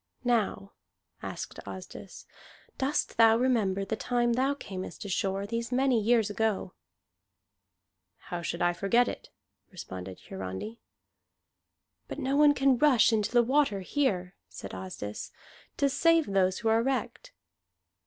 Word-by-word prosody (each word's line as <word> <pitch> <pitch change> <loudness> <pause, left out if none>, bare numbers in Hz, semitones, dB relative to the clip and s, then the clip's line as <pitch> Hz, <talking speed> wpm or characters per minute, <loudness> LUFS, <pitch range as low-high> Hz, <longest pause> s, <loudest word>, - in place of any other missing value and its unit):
"Now," 225 -5 0 0.5
asked - - -6
Asdis, - - -9 0.5
"dost 275 +2 -1
thou 225 0 +6
remember 215 -6 +1
the 220 - -2
time 240 +1 0
thou 265 +3 +1
camest 190 -7 -7
ashore, 195 0 -1
these 230 +3 -4
many 255 -2 +2
years 225 0 +3
ago?" 210 -2 -1 1.6
"How 175 - -2
should 170 +1 -3
I 175 0 +3
forget 235 +7 +2
it?" - - -6 0.4
responded 95 - -8
Hiarandi. 95 - -7 1.3
"But - - -7
no 270 +1 -1
one 295 0 +5
can 270 -2 +3
rush 255 -6 +5
into 215 -2 0
the 240 0 +5
water 255 -5 +2
here," 190 -6 -1 0.2
said 95 - -9
Asdis, 95 +3 -6 0.5
"to 280 - +3
save 330 +3 +3
those 190 -1 +1
who 225 - -3
are 225 +1 +4
wrecked." 270 - -3
225 Hz, 130 wpm, -29 LUFS, 190-255 Hz, 1.6 s, thou